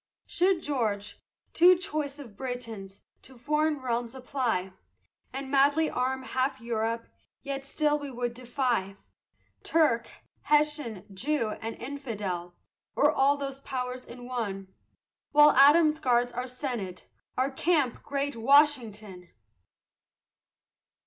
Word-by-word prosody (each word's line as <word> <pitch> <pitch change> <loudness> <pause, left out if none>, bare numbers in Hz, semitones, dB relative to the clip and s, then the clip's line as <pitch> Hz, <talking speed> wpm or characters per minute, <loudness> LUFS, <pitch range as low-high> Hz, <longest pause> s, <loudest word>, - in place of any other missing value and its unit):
Should 360 -1 +1
George, 215 -8 -2 0.3
too 360 +1 +7
choice 305 -6 -3
of 245 -8 -11
Britons, 225 -6 -6 0.2
to 260 - -14
foreign 300 +4 0
realms 240 -1 -2
apply, 245 -8 -2 0.6
And 270 0 -6
madly 285 +3 +3
arm 260 +1 -1
half 265 +1 -1
Europe, 230 0 -2 0.4
yet 275 -1 -5
still 300 0 +1
we 285 -1 -6
would 245 -2 -3
defy 240 -5 -1 0.7
Turk, 295 -8 +2 0.4
Hessian, 295 - +1
Jew, 245 +3 -1
and 225 0 -4
Infidel, 210 -10 -5 0.4
or 295 - +4
all 280 -1 +3
those 275 -1 -5
powers 255 -2 -4
in 245 0 -11
one, 200 -6 -4 0.6
While 295 0 +8
Adams 300 +3 +6
guards 245 -4 +2
our 250 +1 -4
senate, 245 -8 -5 0.3
our 260 +2 +1
camp 290 -3 +1
great 280 -1 -2
Washington! 225 - +2
255 Hz, 115 wpm, -28 LUFS, 230-285 Hz, 0.7 s, While